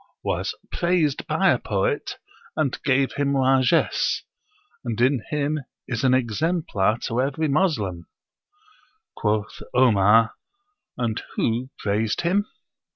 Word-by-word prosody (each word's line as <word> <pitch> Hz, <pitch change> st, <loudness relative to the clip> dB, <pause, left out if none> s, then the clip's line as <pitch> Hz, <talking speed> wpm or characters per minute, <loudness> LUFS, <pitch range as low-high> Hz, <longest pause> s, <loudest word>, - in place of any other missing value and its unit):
_) -, -, -27 dB, 0.2 s
was -, -, -2 dB, 0.2 s
praised 170 Hz, -5 st, 0 dB
by -, -, +3 dB
a -, -, +1 dB
poet, -, -, -1 dB, 0.4 s
and 150 Hz, -5 st, -1 dB
gave 135 Hz, -1 st, +2 dB
him 140 Hz, 0 st, +1 dB
largesse 135 Hz, +4 st, +2 dB, 0.6 s
and 115 Hz, -3 st, -3 dB
in 130 Hz, 0 st, +2 dB
him 150 Hz, +1 st, -1 dB, 0.3 s
is 120 Hz, -1 st, -3 dB
an 130 Hz, -, +4 dB
exemplar 130 Hz, -, +1 dB
to 120 Hz, +1 st, -1 dB
every 145 Hz, +4 st, -1 dB
Moslem." 115 Hz, -, 0 dB, 1.1 s
Quoth 105 Hz, -1 st, -1 dB
Omar, 115 Hz, -2 st, +5 dB, 0.6 s
"And 115 Hz, -3 st, -1 dB
who 120 Hz, +3 st, 0 dB
praised 105 Hz, +2 st, 0 dB
him?" 195 Hz, +5 st, +1 dB
130 Hz, 115 wpm, -24 LUFS, 110-150 Hz, 1.1 s, Omar